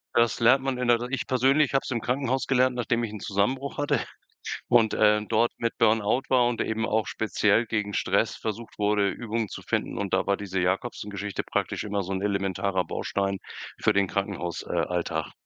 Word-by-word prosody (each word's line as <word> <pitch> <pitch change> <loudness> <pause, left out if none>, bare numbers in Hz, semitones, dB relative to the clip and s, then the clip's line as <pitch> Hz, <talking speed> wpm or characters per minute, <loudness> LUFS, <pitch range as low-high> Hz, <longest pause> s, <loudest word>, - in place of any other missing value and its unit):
Das 115 -1 +3
lernt 125 +3 +5
man 135 -2 -1
in 125 -1 -1
der 120 -1 +4
R 120 +1 -5
ich 135 - -2
persönlich 135 +3 +3
habe 135 - +3
es - - -6
im 120 - 0
Krankenhaus 130 +1 -1
gelernt, 130 -1 +3
nachdem 120 0 0
ich 110 - -3
'n 105 - -7
Zusammenbruch 120 +8 -1
hatte 145 0 +1 0.7
und 115 -3 +4
dort, 110 +2 +3
äh, - - -40
mit 115 0 -2
Burnout 110 +4 +2
war 125 -2 +4
und 120 -2 -1
eben 110 0 -1
auch 110 0 +1
speziell 110 +1 +1
gegen 105 -2 -2
Stress - - +1
versucht 110 +1 -6
wurde, 105 -1 +2
Übungen 110 +1 -3
zu - - -7
finden - - -2
und 100 -2 -3
da - - +2
war 100 - +2
diese 95 -2 -3
Jacobsen 95 +4 -1
Geschichte 100 0 -4
praktisch - - -2
immer 100 -1 -1
so 95 +2 -4
'n 95 - -2
elementarer 100 -2 0
Baustein 100 -1 -2 0.4
für - - +3
den 100 -1 +2
Krankenhaus 95 -3 -3
äh, - - -14
Alltag. 85 -3 -1
110 Hz, 200 wpm, -26 LUFS, 100-120 Hz, 0.7 s, lernt